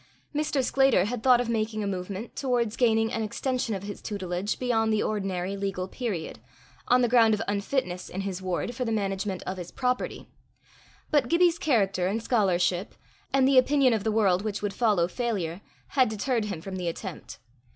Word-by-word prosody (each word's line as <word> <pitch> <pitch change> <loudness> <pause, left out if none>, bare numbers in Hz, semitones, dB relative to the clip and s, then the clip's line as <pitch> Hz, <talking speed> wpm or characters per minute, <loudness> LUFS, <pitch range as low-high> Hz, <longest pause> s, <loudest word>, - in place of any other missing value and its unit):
Mr. 295 -2 0
Sclater 270 -7 +3
had 235 +2 -3
thought 250 0 +5
of 245 - -1
making 215 -1 -1
a - - -2
movement 195 +3 -5
towards 245 -5 0
gaining 225 -2 +2
an 225 - -1
extension 250 +1 -2
of 190 - -6
his 205 0 -7
tutelage 190 -1 -3
beyond 225 -3 +1
the 215 -1 +2
ordinary 195 -2 -2
legal 195 -2 -3
period, 200 -7 -4 0.5
on 250 +1 +4
the - - +4
ground 230 -2 +5
of 210 - -5
unfitness 200 -2 -2
in 190 - -4
his 190 -2 -4
ward 185 +5 -2
for 250 - -3
the 230 - -2
management 195 -2 -2
of 185 - -4
his 175 -1 -6
property; 250 -1 -2 0.8
but 290 -5 +3
Gibbie's 340 0 +3
character 195 -10 +1
and 205 +4 0
scholarship, 185 -5 +1 0.4
and 265 -1 +4
the 270 -1 +7
opinion 270 -1 +3
of 215 -3 -1
the 220 - +1
world 195 -4 +3
which 205 -1 -4
would 205 -1 -1
follow 210 -8 +2
failure, 190 -5 -3 0.3
had 260 -4 +3
deterred 220 +1 -1
him 195 -6 -5
from 190 +2 -6
the 180 -1 -3
attempt. 165 - -6
215 Hz, 185 wpm, -27 LUFS, 190-245 Hz, 0.8 s, the